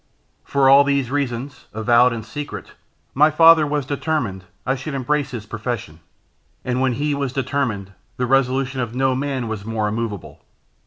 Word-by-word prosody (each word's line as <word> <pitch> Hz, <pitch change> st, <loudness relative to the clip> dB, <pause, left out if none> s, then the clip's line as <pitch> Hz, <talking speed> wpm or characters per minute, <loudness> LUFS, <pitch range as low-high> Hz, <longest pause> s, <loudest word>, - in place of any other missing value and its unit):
For 140 Hz, -1 st, +2 dB
all 140 Hz, +1 st, +8 dB
these 140 Hz, -3 st, 0 dB
reasons, 135 Hz, -1 st, -3 dB
avowed 120 Hz, +3 st, +4 dB
and 115 Hz, -2 st, -5 dB
secret, 145 Hz, +4 st, -7 dB, 0.4 s
my 150 Hz, +3 st, +5 dB
father 165 Hz, 0 st, +6 dB
was 145 Hz, -2 st, -1 dB
determined 130 Hz, -, -2 dB, 0.2 s
I 130 Hz, -, +1 dB
should 135 Hz, +2 st, -5 dB
embrace 140 Hz, +2 st, 0 dB
his 120 Hz, -5 st, -7 dB
profession; 110 Hz, -7 st, -5 dB, 0.7 s
and 125 Hz, 0 st, -1 dB
when 130 Hz, -1 st, +2 dB
he 145 Hz, +4 st, -1 dB
was 140 Hz, -2 st, -2 dB
determined, 125 Hz, -8 st, -2 dB, 0.2 s
the 125 Hz, -, 0 dB
resolution 135 Hz, 0 st, +1 dB
of 120 Hz, -1 st, -4 dB
no 130 Hz, 0 st, +2 dB
man 130 Hz, -2 st, -2 dB
was 110 Hz, -2 st, -5 dB
more 110 Hz, -1 st, -2 dB
immovable. 105 Hz, -3 st, -5 dB
130 Hz, 160 wpm, -21 LUFS, 115-140 Hz, 0.7 s, all